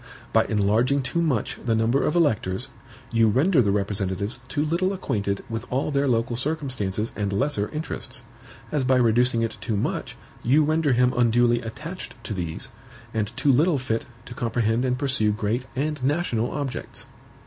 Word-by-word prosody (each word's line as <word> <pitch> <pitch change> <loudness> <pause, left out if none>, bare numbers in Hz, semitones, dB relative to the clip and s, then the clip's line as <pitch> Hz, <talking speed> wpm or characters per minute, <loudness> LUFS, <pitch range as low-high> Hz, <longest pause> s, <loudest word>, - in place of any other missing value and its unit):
By - - +4
enlarging 115 +7 +2
too 170 +6 -1
much 140 -10 -1
the 115 -3 +1
number 115 +5 +2
of 150 - 0
electors, 120 - +1 0.4
you 115 -1 +4
render 135 - +4
the 105 - +1
representatives 100 +2 0
too 145 +2 -1
little 180 +5 +1
acquainted 100 - -2
with 115 +1 -5
all 135 +4 0
their 140 0 +1
local 120 -1 +1
circumstances 125 -7 -1
and 100 -2 -1
lesser 105 -1 +1
interests; 150 -5 -5 0.5
as 150 -3 +1
by 130 0 +3
reducing 120 -1 +3
it 115 - -3
too 110 - -1
much, - - -3 0.2
you 140 +6 +4
render 155 -2 +2
him 125 +1 +3
unduly 120 0 +3
attached 150 +11 -7
to 110 - -4
these, 85 -1 -4 0.4
and 110 -2 -1
too 145 - +3
little 150 +5 +3
fit 120 -3 -2 0.2
to 125 - -8
comprehend 115 0 0
and 125 0 +1
pursue 130 -6 +1
great 110 +4 -2
and 145 0 -2
national 135 -5 0
objects. 140 -3 -5
120 Hz, 165 wpm, -24 LUFS, 110-140 Hz, 0.5 s, By